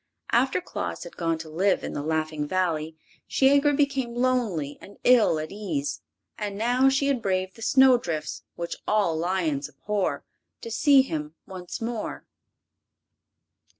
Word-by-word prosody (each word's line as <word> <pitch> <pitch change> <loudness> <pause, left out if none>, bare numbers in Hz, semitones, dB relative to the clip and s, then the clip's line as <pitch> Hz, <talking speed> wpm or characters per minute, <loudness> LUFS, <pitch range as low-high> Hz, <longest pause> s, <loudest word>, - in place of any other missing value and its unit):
After 260 +6 +3
Claus - - -5
had 175 - -11
gone 165 -1 0
to 160 0 -8
live 185 +5 +1
in - - -4
the - - -3
Laughing 155 -1 -1
Valley 160 -3 -1 0.3
Shiegra 280 +2 +4
became 270 -4 0
lonely 235 - 0
and 200 - -13
ill 240 -9 +5
at 155 0 -5
ease, 170 -9 -3 0.4
and 205 -1 -3
now 245 +4 +3
she 270 +1 +1
had 275 -4 +1
braved 185 -1 -1
the 225 - -14
snow 260 +1 +5
drifts, 155 -7 -4
which 170 0 -4
all 205 -6 +2
lions 160 -4 -1
abhor, 205 -2 -2 0.4
to 230 - -7
see 275 +3 +5
him 155 - -5
once 180 +1 -7
more. 230 -1 -4
195 Hz, 150 wpm, -26 LUFS, 160-250 Hz, 0.4 s, ill